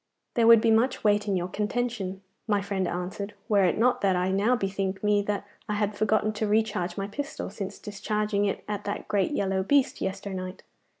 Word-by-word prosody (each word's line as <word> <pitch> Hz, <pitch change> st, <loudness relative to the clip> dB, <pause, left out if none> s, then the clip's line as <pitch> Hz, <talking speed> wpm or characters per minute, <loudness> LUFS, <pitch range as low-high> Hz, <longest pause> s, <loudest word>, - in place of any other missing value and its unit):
'There 230 Hz, -1 st, +3 dB
would 230 Hz, -1 st, +9 dB
be 230 Hz, -1 st, +3 dB
much 240 Hz, +4 st, +2 dB
weight 210 Hz, 0 st, +3 dB
in 200 Hz, -, +1 dB
your 175 Hz, 0 st, -2 dB
contention,' 210 Hz, -1 st, -2 dB, 0.3 s
my 205 Hz, -2 st, +2 dB
friend 195 Hz, -2 st, -2 dB
answered, 190 Hz, +3 st, -4 dB
'were 205 Hz, -2 st, +4 dB
it 175 Hz, -, +1 dB
not 245 Hz, +3 st, +3 dB
that 195 Hz, -2 st, +3 dB
I 180 Hz, +1 st, +1 dB
now 205 Hz, +6 st, +3 dB
bethink 195 Hz, -2 st, -2 dB
me 210 Hz, 0 st, +3 dB
that 205 Hz, 0 st, -2 dB, 0.2 s
I 210 Hz, -, 0 dB
had 205 Hz, 0 st, 0 dB
forgot 215 Hz, 0 st, +1 dB
to 215 Hz, 0 st, -1 dB
recharge 205 Hz, -5 st, 0 dB
my 195 Hz, -, -1 dB
pistol 280 Hz, +3 st, -5 dB
since 195 Hz, -2 st, -6 dB
discharging 210 Hz, 0 st, -1 dB
it 200 Hz, -, -2 dB
at 205 Hz, -1 st, -3 dB
that 205 Hz, -, -4 dB
great 200 Hz, -2 st, +1 dB
yellow 195 Hz, -8 st, 0 dB
beast 275 Hz, +7 st, +2 dB
yesternight. 190 Hz, -1 st, -4 dB
205 Hz, 195 wpm, -27 LUFS, 195-215 Hz, 0.3 s, would